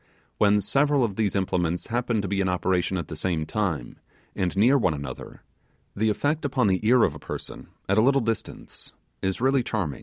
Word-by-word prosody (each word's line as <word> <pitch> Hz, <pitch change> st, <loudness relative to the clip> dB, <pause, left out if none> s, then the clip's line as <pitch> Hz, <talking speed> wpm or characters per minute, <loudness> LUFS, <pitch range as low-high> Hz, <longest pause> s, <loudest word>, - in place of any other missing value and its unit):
When 105 Hz, 0 st, +4 dB
several 140 Hz, +3 st, +2 dB
of 105 Hz, -5 st, -1 dB
these 105 Hz, -2 st, 0 dB
implements 90 Hz, -3 st, 0 dB
happen 120 Hz, -2 st, -1 dB
to -, -, -2 dB
be 100 Hz, +1 st, 0 dB
in 95 Hz, -, 0 dB
operation 90 Hz, 0 st, 0 dB
at 85 Hz, -4 st, -4 dB
the 80 Hz, -, -7 dB
same 80 Hz, -1 st, -1 dB
time, 90 Hz, -, -3 dB, 0.4 s
near 100 Hz, +8 st, +2 dB
one 115 Hz, -, +2 dB
another, 70 Hz, -3 st, -8 dB, 0.5 s
the 110 Hz, +2 st, +1 dB
effect 145 Hz, +9 st, 0 dB
upon 130 Hz, -4 st, +1 dB
the 95 Hz, -2 st, +2 dB
ear 125 Hz, 0 st, +5 dB
of 80 Hz, -, +2 dB
a 75 Hz, -, -10 dB
person, -, -, -8 dB, 0.2 s
at 100 Hz, +2 st, +3 dB
a -, -, +6 dB
little 135 Hz, +4 st, +4 dB
distance, 115 Hz, -1 st, -5 dB, 0.3 s
is 95 Hz, 0 st, -1 dB
really 135 Hz, +2 st, +3 dB
charming. 105 Hz, -, -3 dB
100 Hz, 190 wpm, -25 LUFS, 90-120 Hz, 0.5 s, a